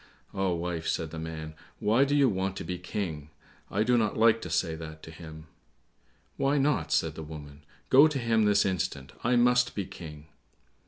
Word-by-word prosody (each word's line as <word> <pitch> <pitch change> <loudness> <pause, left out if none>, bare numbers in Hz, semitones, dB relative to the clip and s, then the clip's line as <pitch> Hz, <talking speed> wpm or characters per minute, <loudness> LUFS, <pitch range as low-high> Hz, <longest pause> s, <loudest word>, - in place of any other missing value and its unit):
"Ah, 95 -1 0
wife," 85 -1 -3
said 80 -2 -1
the 80 - -6
man, 80 -1 -6 0.3
"why 115 +6 +3
do 145 +1 0
you 140 -2 +5
want 95 -3 -1
to - - -5
be 90 -1 -4
King? 85 -5 -4 0.4
I 105 +2 +1
do 120 +1 +3
not 110 -2 0
like 115 0 +4
to - - -6
say 80 -3 0
that 80 -1 -9
to 80 - -9
him." 80 -1 -11 0.9
"Why 140 +2 +2
not?" 135 - +1
said 80 0 +1
the 80 - -8
woman; 75 -2 -10 0.3
"go 140 +4 +8
to 150 -3 -2
him 115 -3 +2
this 105 0 +4
instant; 90 -7 -2
I 125 +1 +2
must 125 +1 +3
be 100 - -2
King!" 80 -5 -10
95 Hz, 195 wpm, -28 LUFS, 80-115 Hz, 0.9 s, go